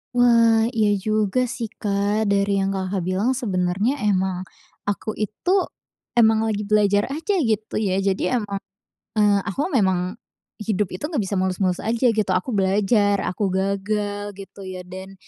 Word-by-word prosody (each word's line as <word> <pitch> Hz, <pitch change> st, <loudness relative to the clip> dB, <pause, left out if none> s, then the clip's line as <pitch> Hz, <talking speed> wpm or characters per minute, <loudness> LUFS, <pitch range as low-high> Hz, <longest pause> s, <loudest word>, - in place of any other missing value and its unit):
Wah, 230 Hz, -2 st, +5 dB
iya 215 Hz, -2 st, +2 dB, 0.2 s
juga 215 Hz, +3 st, +1 dB
sih, 235 Hz, -2 st, -4 dB
Kak. 205 Hz, +1 st, -1 dB
Dari 200 Hz, 0 st, +2 dB
yang 195 Hz, 0 st, 0 dB
Kakak 190 Hz, -1 st, -2 dB
bilang 185 Hz, +6 st, 0 dB
sebenarnya 200 Hz, +4 st, 0 dB
emang, 185 Hz, -1 st, 0 dB, 0.5 s
aku 210 Hz, +2 st, -3 dB
itu 215 Hz, -, -1 dB, 0.6 s
emang 220 Hz, -1 st, +5 dB
lagi 210 Hz, -1 st, -2 dB
belajar 205 Hz, -1 st, +3 dB
aja 370 Hz, +6 st, -1 dB
gitu 220 Hz, -, 0 dB
ya. 195 Hz, -3 st, +1 dB
Jadi 195 Hz, -1 st, 0 dB
emang, 205 Hz, -4 st, -1 dB, 0.6 s
eee, 205 Hz, -1 st, +4 dB
aku 205 Hz, -, -3 dB
memang, 190 Hz, -1 st, +1 dB, 0.4 s
hidup 210 Hz, -2 st, -1 dB
itu 185 Hz, +10 st, -4 dB
nggak 295 Hz, -8 st, -1 dB
bisa 195 Hz, 0 st, -2 dB
mulus-mulus 185 Hz, -1 st, 0 dB
aja 235 Hz, +2 st, +1 dB
gitu 215 Hz, -2 st, 0 dB
aku 185 Hz, +8 st, -1 dB
belajar, 205 Hz, 0 st, +2 dB
aku 200 Hz, +2 st, -1 dB
gagal, 205 Hz, +2 st, -2 dB
gitu 195 Hz, 0 st, -11 dB
ya. 185 Hz, -1 st, -6 dB
Dan 190 Hz, +2 st, -9 dB
205 Hz, 150 wpm, -22 LUFS, 190-220 Hz, 0.6 s, Wah